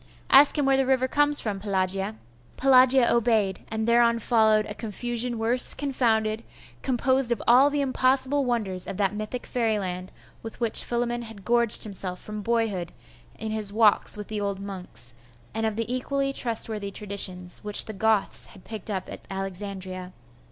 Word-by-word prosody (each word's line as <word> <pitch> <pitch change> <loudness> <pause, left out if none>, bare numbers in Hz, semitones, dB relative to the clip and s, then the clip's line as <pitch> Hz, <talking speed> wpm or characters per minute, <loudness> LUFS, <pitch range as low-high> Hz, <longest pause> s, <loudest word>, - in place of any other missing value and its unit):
Ask 290 +2 +7
him 290 - +1
where 270 0 +3
the 270 -1 +1
river 260 -1 +2
comes 290 +2 +3
from, 205 -3 -3
Pelagia.' 195 +1 -2 0.4
Pelagia 260 -1 +5
obeyed.... 220 -5 +1
and 220 0 -3
thereon 235 0 +4
followed 220 -2 +2
a 210 - -6
confusion 235 +3 -3
worse 235 +3 +2
confounded, 230 -5 0 0.4
composed 260 0 +1
of 235 - 0
all 255 +4 +6
the 290 0 -1
impossible 265 +1 +1
wonders 210 -8 -1
of 185 - -6
that 200 -1 0
mythic 215 +4 -5
fairyland 195 -6 -2 0.3
with 225 - -9
which 230 -2 +2
Philammon 240 0 -2
had 220 -4 -11
gorged 235 0 +2
himself 190 -3 -5
from 210 0 -7
boyhood 210 -6 -1 0.5
in 220 0 -5
his 215 -2 -2
walks 210 -1 +2
with 210 - -7
the 215 -1 -4
old 200 -1 -3
monks, 185 -11 -8 0.4
and 225 +1 -1
of 220 - -3
the 230 +1 -2
equally 275 +1 -2
trustworthy 225 -5 +1
traditions 190 -3 -1
which 210 -1 +2
the 220 - -7
Goths 220 0 +1
had 190 - -17
picked 220 -2 -6
up 190 -3 -3
at - - -9
Alexandria. 190 -1 -4
220 Hz, 165 wpm, -25 LUFS, 200-245 Hz, 0.5 s, Ask